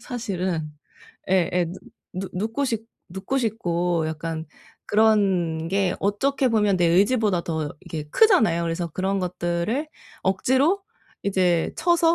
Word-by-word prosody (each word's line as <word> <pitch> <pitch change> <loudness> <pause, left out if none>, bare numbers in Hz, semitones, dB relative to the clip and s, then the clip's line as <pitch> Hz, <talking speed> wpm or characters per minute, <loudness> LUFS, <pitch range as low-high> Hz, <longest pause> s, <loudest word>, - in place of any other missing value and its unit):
사실은. 185 -10 -3 0.6
예예. 180 -1 +2
누 185 - -9 0.4
눕 190 0 -4
눕고 225 +9 -1
싶 225 -4 -2 0.2
눕고 190 +9 -3
싶고 175 -8 0
약간 160 +1 -4 0.4
그런게 195 -4 +2
어떻게 260 +7 +1
보면 210 -4 +2
내 175 - +3
의지보다 200 +1 +3
더 160 -3 -2
이게 155 -2 -6
크잖아요. 220 - +4
그래서 170 +1 -2
그런것들을 185 - -1 0.8
억지로 370 +7 +2 0.4
이제 180 -4 +1
쳐서 335 0 +3
190 Hz, 250 characters per minute, -24 LUFS, 170-225 Hz, 0.8 s, 크잖아요